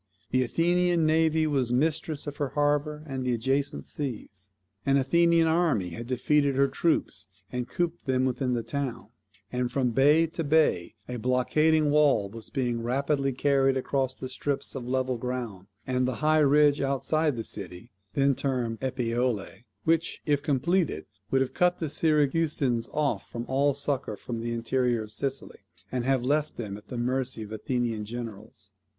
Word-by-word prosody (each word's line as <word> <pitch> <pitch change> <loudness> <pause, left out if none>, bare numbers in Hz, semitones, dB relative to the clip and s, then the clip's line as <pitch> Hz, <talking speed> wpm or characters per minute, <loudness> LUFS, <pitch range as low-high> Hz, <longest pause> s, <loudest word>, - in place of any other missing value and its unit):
the 130 - +3
Athenian 175 +5 +2
navy 160 0 +3
was 135 -6 0
mistress 155 +3 0
of 145 -1 -6
her 145 - 0
harbour 150 +1 +1
and 135 -3 -4
the 125 -1 +1
adjacent 135 +4 -1
seas; 105 -8 -6 0.3
an 140 0 +3
Athenian 170 +4 +4
army 160 - +2
had 115 +7 -7
defeated 140 +2 +2
her 140 +1 +4
troops, 135 - 0 0.2
and 125 -1 -3
cooped 175 0 -2
them 130 0 +2
within 130 0 0
the 120 -1 -1
town; 130 -6 -4 0.4
and 125 -1 -1
from 130 -3 +1
bay 145 +7 +5
to 165 +1 -4
bay 150 - +2
a 125 - -4
blockading 145 +6 +2
wall 145 -9 +4
was 115 +2 -9
being 120 -4 -1
rapidly 135 +3 0
carried 135 0 +2
across 130 0 -1
the 130 - -6
strips 135 +2 -2
of 125 -3 -6
level 130 -1 0
ground 120 -7 -4 0.2
and 130 0 0
the 130 - -2
high 155 0 +5
ridge 145 0 +4
outside 140 +2 +1
the 115 - -4
city 100 +3 -6 0.2
(then 140 0 +3
termed 125 -4 -2
Epipolae), 120 -3 -2 0.2
which, 165 0 +1
if 145 -2 +2
completed, 145 - 0 0.2
would 135 - +2
have 135 - -1
cut 180 0 +2
the 160 - -3
Syracusans 150 -5 +1
off 150 -2 -1
from 120 0 -5
all 140 +1 +2
succour 140 -6 -2
from 115 -2 -5
the 120 0 -3
interior 120 0 0
of 105 - -10
Sicily, 135 +3 -4 0.3
and 125 -2 -2
have 130 -2 +1
left 150 +2 0
them 105 -4 -5
at 105 0 -12
the 125 - -6
mercy 125 -1 -1
of 105 - -9
the 110 - -5
Athenian 120 -2 -1
generals. 105 -2 -8
135 Hz, 170 wpm, -27 LUFS, 120-150 Hz, 0.4 s, bay